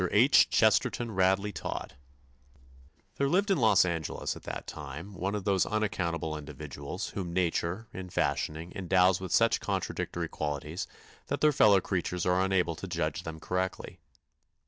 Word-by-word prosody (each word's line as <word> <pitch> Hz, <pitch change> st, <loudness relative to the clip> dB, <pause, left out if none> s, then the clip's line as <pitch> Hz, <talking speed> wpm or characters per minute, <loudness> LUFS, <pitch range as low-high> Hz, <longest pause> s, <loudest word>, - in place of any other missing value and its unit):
H. -, -, +5 dB
CHESTERTON 120 Hz, -2 st, +2 dB
RADLEY 95 Hz, +1 st, +2 dB
TODD -, -, -5 dB, 1.2 s
There 140 Hz, 0 st, +1 dB
lived 195 Hz, +5 st, +2 dB
in 185 Hz, -, +3 dB
Los 105 Hz, -6 st, +5 dB
Angeles 85 Hz, -3 st, -2 dB
at -, -, -10 dB
that -, -, -5 dB
time 80 Hz, +7 st, -8 dB
one 95 Hz, +3 st, -2 dB
of 105 Hz, -, -3 dB
those 95 Hz, -1 st, +2 dB
unaccountable 85 Hz, -7 st, -1 dB
individuals 75 Hz, +4 st, -6 dB
whom 90 Hz, -4 st, -5 dB
nature, 90 Hz, +3 st, 0 dB
in 95 Hz, -1 st, -7 dB
fashioning, 80 Hz, 0 st, -1 dB
endows 95 Hz, 0 st, +3 dB
with 95 Hz, -2 st, -5 dB
such -, -, +4 dB
contradictory -, -, -3 dB
qualities 75 Hz, +5 st, -4 dB, 0.4 s
that -, -, -2 dB
their 150 Hz, -1 st, +5 dB
fellow 105 Hz, -6 st, +6 dB
creatures 90 Hz, -1 st, -2 dB
are 90 Hz, +1 st, +3 dB
unable 90 Hz, -3 st, +1 dB
to 95 Hz, -, -6 dB
judge 85 Hz, -2 st, -2 dB
them 80 Hz, -2 st, -7 dB
correctly. 90 Hz, +1 st, -3 dB
90 Hz, 145 wpm, -29 LUFS, 85-100 Hz, 1.2 s, fellow